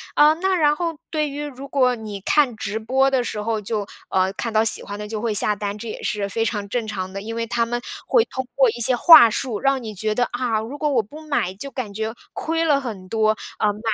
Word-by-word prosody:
啊， 300 +1 +6
那 375 +3 0
然 300 -3 +3
后 330 -1 -3
对 305 -2 -1
于 290 +1 -5
如 275 -1 -8
果 255 -3 +2
你 215 -3 -7
看 260 +2 +2
直 215 0 -3
播 265 +4 +2
的 260 -2 +1
时 210 -3 -4
候 220 0 -1
就 210 -1 -3 0.2
呃， 190 0 +2
看 230 +3 -4
到 215 - +4
喜 225 - +1
欢 205 +1 -7
的 210 - -5
就 215 0 -4
会 230 -1 -1
下 210 +1 +2
单， 205 0 -4
这 225 +2 -7
也 - - -7
是 205 -1 -1
非 225 +3 -1
常 205 -3 -2
正 235 0 -1
常 185 -3 -4
的。 195 - -5
因 225 +2 -6
为 230 0 -2
他 235 0 +1
们 240 +1 -3 0.3
会 465 -2 +4
通 260 - -5
过 265 -3 +5
一 220 - -3
些 240 +1 +3
话 245 -3 +9
术， 225 -2 -2
让 275 -1 +1
你 215 -2 -7
觉 215 +3 -1
得： 245 - +2
“啊， 245 -3 0
如 235 +6 -6
果 300 0 0
我 260 -5 +2
不 295 +10 -12
买 275 -11 -1
就 275 +8 -7
感 225 -7 -5
觉 220 +1 -3 0.2
亏 325 +1 -1
了 290 -3 +3
很 205 -7 -7
多， 215 -1 +2 0.2
呃， 210 - +2
买 210 - -11
230 Hz, 275 characters per minute, -22 LUFS, 210-275 Hz, 0.3 s, 话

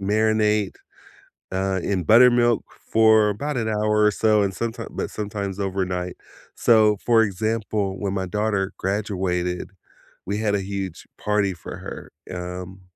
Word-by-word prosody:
marinate, 105 0 +1 0.8
uh, 95 0 0
in 95 -3 -1
buttermilk 120 +3 +5 0.3
for 110 -1 +5
about 140 +7 -3
an 115 -2 -1
hour 105 0 +2
or 105 - +5
so, 105 0 +3
and 95 -1 -1
sometime 115 +4 -4
but - - -3
sometimes 100 -2 -4
overnight. 95 -2 -2 0.4
So, 110 -3 +4
for 115 -2 +5
example, 105 -1 -1
when 100 -2 -2
my 95 -1 -1
daughter 100 0 -1
graduated, 95 -3 -2 0.5
we 100 +2 -2
had 105 -2 +1
a 100 - 0
huge 95 -2 -5
party 105 -2 0
for 85 - -9
her, - - -9 0.2
um, 90 +1 -7
105 Hz, 140 wpm, -23 LUFS, 95-110 Hz, 0.8 s, buttermilk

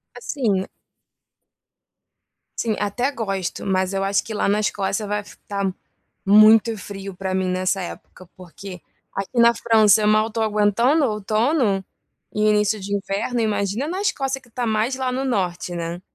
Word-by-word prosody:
Assim 225 -6 -1 1.9
assim, 220 -2 0
até 240 +7 -1
gosto, 195 -8 -4
mas 190 0 0
eu 195 0 -1
acho 200 0 +1
que 220 - -7
lá 210 - 0
na 205 +1 +2
Escócia 205 0 -1
vai 210 0 -1
f 205 - -15
tá 200 -2 -2 0.5
muito 215 +2 +6
frio 195 -1 -8
para 190 0 -3
mim 185 0 0
nessa 185 +1 0
época, 180 0 -10
porque 185 +1 -10 0.3
aqui 195 +5 -3
na 235 0 +6
França 220 -2 +4
eu 210 - +2
mal 215 +1 +3
estou 225 0 -2
aguentando 220 +8 +2
o - - +1
outono 215 0 +1 0.5
e 210 - 0
o - - +4
início 210 0 +2
de 200 +1 -3
inverno, 200 +5 -2
imagina 210 +5 -1
na 370 +4 -3
Escócia 270 -10 -1
que 245 - -22
está 245 +1 -3
mais 220 +4 0
lá 260 -1 -2
no 265 +2 -2
norte, 180 -6 -2
né. 170 +1 -4
210 Hz, 165 wpm, -22 LUFS, 195-230 Hz, 1.9 s, muito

